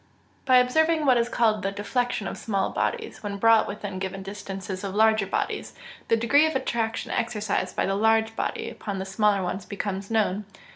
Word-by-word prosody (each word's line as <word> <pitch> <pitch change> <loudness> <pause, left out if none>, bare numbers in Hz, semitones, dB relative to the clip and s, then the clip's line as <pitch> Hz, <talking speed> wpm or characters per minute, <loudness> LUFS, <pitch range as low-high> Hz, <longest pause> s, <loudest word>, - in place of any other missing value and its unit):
_ - - -35
By 255 -2 +6
observing 315 +5 +3
what 255 -3 +5
is 235 0 +1
called 220 -3 +2
the 195 0 -1
deflection 215 +1 -2
of - - -4
small 195 -3 -1
bodies 460 -3 -2
when 205 -1 -4
brought 225 +2 +5
within 200 -2 -5
given 190 0 -4
distances 195 -1 -6
of 195 -1 -4
larger 220 -2 +4
bodies, - - -3 0.3
the 230 - +3
degree 285 +7 +4
of 315 - -3
attraction 230 -3 -2
exercised 210 -5 -1
by - - +1
the 195 - 0
large 220 +2 +2
body - - -3
upon 200 -3 -5
the 190 - -4
smaller 200 0 +1
one 180 +1 -2
becomes 200 -1 -4
known. 210 -2 0
210 Hz, 190 wpm, -25 LUFS, 195-235 Hz, 0.3 s, By